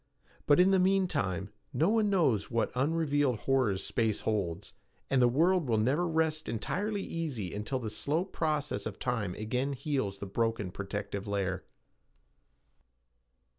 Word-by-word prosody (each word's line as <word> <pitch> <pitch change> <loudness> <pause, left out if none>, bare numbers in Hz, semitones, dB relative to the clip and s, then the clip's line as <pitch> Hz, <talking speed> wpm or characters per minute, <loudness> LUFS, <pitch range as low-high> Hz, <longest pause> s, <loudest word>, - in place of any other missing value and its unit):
But 145 +1 +6
in 185 +2 +6
the 190 - +4
mean 190 +1 +3
time, 95 - -2 0.2
no 165 +5 +3
one 220 -1 +3
knows 155 - +2
what 115 -1 0
unrevealed 145 -3 +1
horrors 125 -8 +1
space 110 -3 0
holds, 95 -7 -2 0.4
and 135 -2 +4
the 125 - +6
world 165 +4 +2
will 110 - +3
never 135 +11 +2
rest 160 -1 0
entirely 200 - -2
easy 135 - -4
until 105 +6 -2
the 115 -4 -4
slow 145 - -1
process 150 - -1
of 105 - -7
time 115 -8 -2
again 125 +6 -1
heals 130 -8 -2
the 100 - -6
broken 110 -1 -1
protective 100 +1 -5
layer. 100 -2 -2
130 Hz, 145 wpm, -31 LUFS, 105-160 Hz, 0.4 s, But